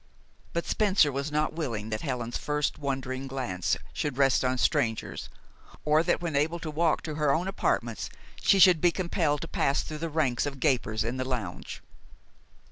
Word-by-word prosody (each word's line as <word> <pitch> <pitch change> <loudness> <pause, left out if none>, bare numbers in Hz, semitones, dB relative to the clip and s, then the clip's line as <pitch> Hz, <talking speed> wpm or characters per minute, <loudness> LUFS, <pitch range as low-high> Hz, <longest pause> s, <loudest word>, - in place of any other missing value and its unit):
But 170 - -1
Spencer 195 -8 +3
was 140 +2 -3
not 150 +1 0
willing 115 -10 -3
that 110 - -2
Helen's 125 -5 -3
first 150 +1 -1
wondering 135 -1 -3
glance 120 -10 -1 0.2
should 145 -4 -2
rest 135 -2 +4
on 130 0 +1
strangers, 115 -2 0 0.6
or 155 +1 +4
that, 170 0 +1
when 165 -4 -2
able 155 +4 +1
to 165 -2 -5
walk 160 +1 +1
to 155 - -4
her 150 -2 +4
own 170 +6 +1
apartments, 195 - -1 0.3
she 200 - +5
should 180 -4 +7
be 175 - +6
compelled 165 -5 0
to - - -4
pass 140 +1 +1
through 155 -1 -6
the 165 +1 -3
ranks 145 -4 +1
of 140 -1 -6
gapers 120 -7 +1
in 120 +3 -3
the 130 - -1
lounge. 120 -9 -5
145 Hz, 180 wpm, -28 LUFS, 130-160 Hz, 0.6 s, should